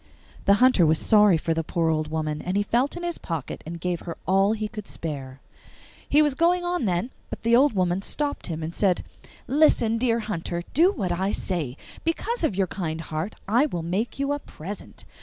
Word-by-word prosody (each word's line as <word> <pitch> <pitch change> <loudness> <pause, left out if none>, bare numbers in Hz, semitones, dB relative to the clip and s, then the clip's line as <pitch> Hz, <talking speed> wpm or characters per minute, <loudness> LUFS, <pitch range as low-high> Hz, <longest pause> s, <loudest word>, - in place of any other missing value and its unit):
The 200 - +6
Hunter 250 -4 +5
was 160 0 +4
sorry 210 0 +5
for 165 +1 -1
the 165 0 -1
poor 165 0 0
old 155 -1 0
woman, 155 -1 -2
and 185 +2 -1
he 205 - +2
felt 245 +9 0
in 350 - -6
his 345 -1 -2
pocket 160 -6 -5
and 170 +1 -6
gave 175 0 -2
her 170 - -7
all 195 +3 +3
he 215 -1 -2
could 210 -2 -8
spare. 135 -4 -6 0.7
He 300 +2 +6
was 295 -2 +2
going 345 +5 +2
on 350 -7 0
then, 185 +6 0 0.2
but - - -7
the 230 +1 +4
old 275 +2 +5
woman 185 -1 +1
stopped 290 +7 -2
him 160 -2 -4
and 160 +2 -4
said, 190 -2 +1 0.4
'Listen, 250 -6 +3
dear 235 -1 +2
hunter, 175 -5 -3
to 335 - +3
what 195 - -2
I 190 +3 0
say. 155 -12 -3 0.3
Because 435 +7 -1
of 225 - +1
your 195 0 +2
kind 165 -3 -4
heart 160 +5 -4
I 240 +8 +3
will 175 - -4
make 190 +8 -2
you 275 +1 -1
a 290 - -2
present. 195 - -9
195 Hz, 210 wpm, -25 LUFS, 165-250 Hz, 0.7 s, The